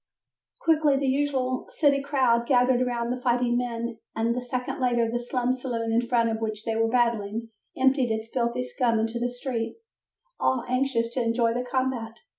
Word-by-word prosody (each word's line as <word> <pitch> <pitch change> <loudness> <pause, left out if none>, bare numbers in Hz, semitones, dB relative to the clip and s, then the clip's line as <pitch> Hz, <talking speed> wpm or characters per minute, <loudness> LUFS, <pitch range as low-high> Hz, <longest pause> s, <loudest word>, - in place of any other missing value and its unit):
Quickly 305 -4 +3
the 275 - -1
usual 265 -2 0
city 280 -3 +4
crowd 255 -4 +2
gathered 250 -1 +4
about 240 -1 -1
the 250 0 -3
fighting 245 -1 +2
men 235 -1 -2 0.2
and 230 +1 +1
a 250 - -2
second 250 0 -4
later 240 -2 +2
the 240 +2 -1
slum 245 +1 0
saloon 240 -3 -3
in 230 +1 +3
front 235 -1 +1
of 220 - -2
which 215 -1 -3
they 225 - -1
were 225 0 +2
battling, 230 -2 0 0.3
emptied 265 -1 +3
its 220 +1 -3
filthy 245 0 0
scum 250 -2 0
into 225 +2 -1
the 245 +1 0
street, 245 -2 -4 0.6
all 255 -2 +1
anxious 250 -2 0
to 255 - 0
enjoy 230 0 +1
the 245 +1 -1
combat. 250 -3 -2
245 Hz, 180 wpm, -26 LUFS, 230-255 Hz, 0.6 s, city